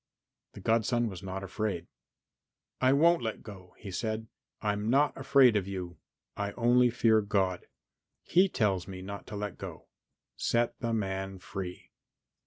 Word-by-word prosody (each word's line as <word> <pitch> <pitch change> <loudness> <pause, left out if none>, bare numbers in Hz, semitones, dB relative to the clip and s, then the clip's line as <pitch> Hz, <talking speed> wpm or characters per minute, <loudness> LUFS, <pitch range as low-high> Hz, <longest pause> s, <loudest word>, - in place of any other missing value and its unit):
The - - -10
godson 115 +1 +2
was 95 -4 -8
not 95 0 -5
afraid. 95 -3 -3 1.0
"I 130 0 +5
won't 165 +5 +5
let 110 -2 -4
go," 95 -4 -11
he 100 - -8
said. 110 +2 -2 0.3
"I'm 105 0 -1
not 140 +4 +3
afraid 135 -3 +5
of 100 -2 0
you; 90 -3 -5 0.4
I 100 0 -3
only 120 +1 +4
fear 115 -2 +3
God. 95 -3 0 0.6
He 185 +4 +4
tells 95 - 0
me 95 -1 -7
not 100 +1 -7
to - - -7
let 105 -2 -4
go. - - -8 0.5
Set 120 0 0
the 115 -1 -2
man 95 -3 -2
free." 90 0 -7
105 Hz, 150 wpm, -30 LUFS, 95-120 Hz, 1.0 s, I